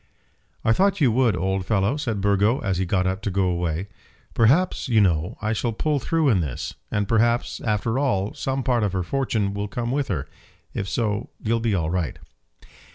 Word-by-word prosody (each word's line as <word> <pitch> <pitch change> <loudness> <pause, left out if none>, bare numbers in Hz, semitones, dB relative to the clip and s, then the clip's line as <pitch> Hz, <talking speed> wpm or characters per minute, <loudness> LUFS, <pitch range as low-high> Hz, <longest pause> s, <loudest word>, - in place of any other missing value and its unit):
"I 110 - +5
thought 200 - +2
you 135 -7 +4
would, 115 -4 +2
old 95 +3 -1
fellow," 100 +5 +1
said 115 -9 -2
Burgo, 100 +4 +3
as 95 -5 -1
he 95 - 0
got 95 0 +1
up 95 +2 -1
to 105 - -2
go 95 0 +1
away. 85 0 -1 0.5
"Perhaps, 145 +12 +3
you 115 -3 +4
know, 85 -5 +1
I 110 +1 +1
shall 115 +1 -1
pull 150 +5 0
through 160 +3 +1
in 105 -7 +3
this; 70 -6 -4 0.2
and 105 -1 -1
perhaps, 115 +2 +1
after 110 +3 0
all, 105 -8 0
some 135 0 -2
part 125 -3 +1
of 100 -3 0
her 95 -1 0
fortune 110 -3 -1
will 100 +1 -3
come 120 +3 -3
with 140 0 0
her. 75 -7 -2 0.5
If 95 - -3
so 110 -2 -1
you'll 115 +1 +1
be 115 -3 0
all 80 -3 -1
right." 90 -4 -2
105 Hz, 200 wpm, -24 LUFS, 95-120 Hz, 0.5 s, I